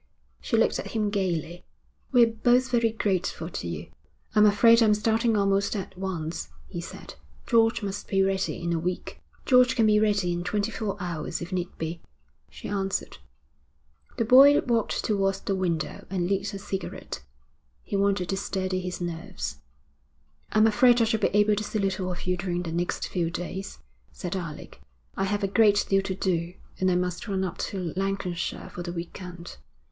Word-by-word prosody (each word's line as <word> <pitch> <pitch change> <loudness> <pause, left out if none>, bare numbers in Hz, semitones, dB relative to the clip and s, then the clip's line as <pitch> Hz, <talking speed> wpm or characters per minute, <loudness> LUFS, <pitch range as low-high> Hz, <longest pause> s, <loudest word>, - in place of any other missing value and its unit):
She - - 0
looked - - +2
at - - -6
him 210 -2 0
gaily. 175 -3 -2 0.5
'We're 235 -3 +5
both 250 +1 +4
very 230 -2 +3
grateful 200 -4 -1
to - - -5
you.' - - -6 0.4
'I'm 210 -1 +6
afraid 230 +3 +6
I'm 215 -2 +5
starting 225 +1 +2
almost 200 +1 +1
at 195 - -5
once,' 180 -4 -4 0.2
he 175 - -5
said. - - -9 0.3
'George 230 -1 +3
must 200 0 -4
be 195 -1 +2
ready 190 -1 -1
in 170 0 0
a 165 - 0
week.' 180 +2 -4 0.2
'George 250 0 +5
can 230 -3 +3
be 210 -1 +5
ready 205 -4 +2
in 175 0 -3
twenty 205 +4 -1
four 205 -3 -3
hours 170 -4 -3
if 170 - -7
need 180 -1 -3
be,' 165 +1 -4 0.5
she - - -9
answered. 195 -1 -2 1.0
The 230 - +1
boy 270 +5 +8
walked 230 -3 0
towards 195 -2 +1
the 195 - -1
window 170 -5 -2
and 180 -2 -1
lit 200 +2 -1
a - - -3
cigarette. 195 -1 -5 0.6
He - - -4
wanted 195 -2 +1
to 195 - 0
steady 185 -1 -2
his 180 0 -5
nerves. 170 -1 -5 0.9
'I'm 215 0 +5
afraid 240 +3 +5
I - - +5
shall 220 0 +1
be - - +3
able 210 +1 +3
to 210 - -2
see 215 - -3
little 190 -2 -1
of 175 - -6
you 180 0 0
during 175 -1 -2
the 165 - -4
next 175 +2 -2
few 170 -3 -1
days,' 180 - -5 0.3
said 180 +1 -5
Alec. 165 -5 -7 0.3
'I 195 - 0
have 205 +1 -1
a - - +2
great 205 0 +4
deal 195 0 +4
to 190 -1 -3
do, 175 -2 -1 0.2
and 185 - +2
I 180 - +2
must 180 +2 -2
run 190 -2 -1
up 185 -1 -4
to 180 -5 -4
Lancashire 195 -2 -3
for 175 - -7
the 175 0 -4
week 170 +2 -6
end.' 175 -1 -9
195 Hz, 185 wpm, -26 LUFS, 180-210 Hz, 1.0 s, boy